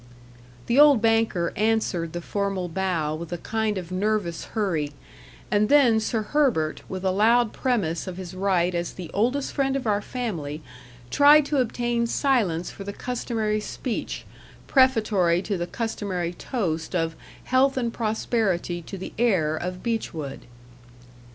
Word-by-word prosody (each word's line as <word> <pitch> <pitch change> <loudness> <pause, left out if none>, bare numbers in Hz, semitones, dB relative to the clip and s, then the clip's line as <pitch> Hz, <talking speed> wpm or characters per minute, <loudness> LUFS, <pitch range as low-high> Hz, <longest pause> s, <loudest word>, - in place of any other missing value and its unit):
The 240 +4 +2
old 290 -4 +8
banker 225 -6 +1
answered 210 -6 0
the 175 - -4
formal 195 -2 -2
bow 170 -4 -1
with 165 +2 -6
a 175 - -2
kind 220 +2 -1
of 180 -1 -6
nervous 190 -3 -1
hurry; 165 -9 -1 0.6
and 210 +1 +3
then 255 -6 +5
Sir 220 0 -1
Herbert, 210 - +1
with 190 0 -5
a 190 - +3
loud 225 +4 +3
premise 200 -11 -1
of 185 -1 -6
his 185 -1 -7
right 185 -2 +1
as 170 0 -2
the 180 -3 -8
oldest 250 +7 0
friend 270 -1 +1
of 270 -2 -2
our 205 -2 +1
family, 165 - -4 0.5
tried 295 +1 +7
to 290 - -1
obtain 240 -1 0
silence 220 - +1
for 195 - -9
the 200 +1 -6
customary 225 -3 -2
speech, 230 +3 -4 0.4
prefatory 215 - +3
to 205 - -2
the 175 -1 -3
customary 185 -5 -3
toast 175 - -3
of 165 -2 0 0.3
"Health 265 +1 +2
and 235 -2 -1
prosperity 215 -6 -1
to 195 +4 -8
the 190 - -7
heir 180 -10 +2
of 180 +3 -5
Beechwood." 165 - -3
205 Hz, 150 wpm, -25 LUFS, 175-235 Hz, 0.6 s, old